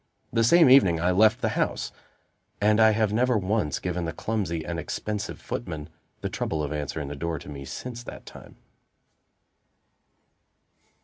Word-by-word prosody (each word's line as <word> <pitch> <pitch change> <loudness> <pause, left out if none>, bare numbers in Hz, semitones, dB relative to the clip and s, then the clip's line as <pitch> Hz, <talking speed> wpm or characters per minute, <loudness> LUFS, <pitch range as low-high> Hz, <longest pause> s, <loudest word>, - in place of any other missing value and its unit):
The 115 -1 +3
same 165 +7 +6
evening 110 -11 +6
I 90 +2 +2
left 110 +5 +4
the - - +1
house, - - -1 0.7
and 105 +1 +3
I 110 0 +7
have 110 -1 +1
never 125 +1 +2
once 100 -6 0
given 90 -1 -3
the 80 - -2
clumsy 90 -5 -2
and 85 -1 -3
expensive 105 +6 -4
footman 80 -9 -5 0.3
the - - -2
trouble 80 -1 -2
of 75 +1 -3
answering 75 0 -4
the 75 - -5
door 85 +2 -3
to 75 - -10
me 70 -2 -7
since 120 - -6
that - - -10
time. - - -13
95 Hz, 160 wpm, -26 LUFS, 80-110 Hz, 0.7 s, I